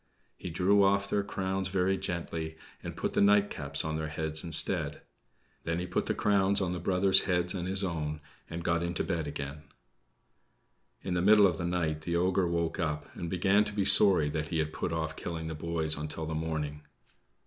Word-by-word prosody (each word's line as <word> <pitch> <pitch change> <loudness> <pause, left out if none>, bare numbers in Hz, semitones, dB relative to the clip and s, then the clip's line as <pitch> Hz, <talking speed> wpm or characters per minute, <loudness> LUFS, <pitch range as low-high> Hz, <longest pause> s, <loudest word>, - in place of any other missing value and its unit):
He - - -7
drew 95 +4 +3
off 100 0 +2
their 100 0 0
crowns 95 -1 -2
very 95 0 +1
gently, 85 -4 -4 0.2
and - - -7
put - - -2
the - - +2
nightcaps 100 -9 +1
on 80 0 -2
their 80 0 -3
heads 80 0 -1
instead. 85 -2 +3 0.6
Then 85 0 -2
he 90 - -3
put 90 - -2
the - - 0
crowns 100 -1 +2
on 90 -2 -1
his 90 - -5
brothers' 95 +2 +3
heads 90 -1 0
and 90 -2 -4
his 95 +1 0
own, 75 -4 -3 0.3
and 85 0 -6
got 85 0 0
into 85 0 -2
bed 80 -3 -2
again. 70 0 -6 1.4
In 95 - -3
the 90 - 0
middle 105 +2 +6
of 85 -4 +1
the 85 - -2
night 80 -3 -1
the 85 +2 -3
ogre 90 +1 +1
woke 85 +2 -2
up, 75 -3 -3
and 85 - -5
began 95 +4 +3
to 105 - -5
be 100 -2 0
sorry 95 -8 +6
that 75 0 -3
he 80 - -2
had 80 -1 -1
put 90 - -3
off 80 -1 -3
killing 80 -1 -5
the 80 - -4
boys 80 0 -2
until 75 +2 -5
the 80 - -4
morning. 80 -2 -3
85 Hz, 200 wpm, -29 LUFS, 80-95 Hz, 1.4 s, middle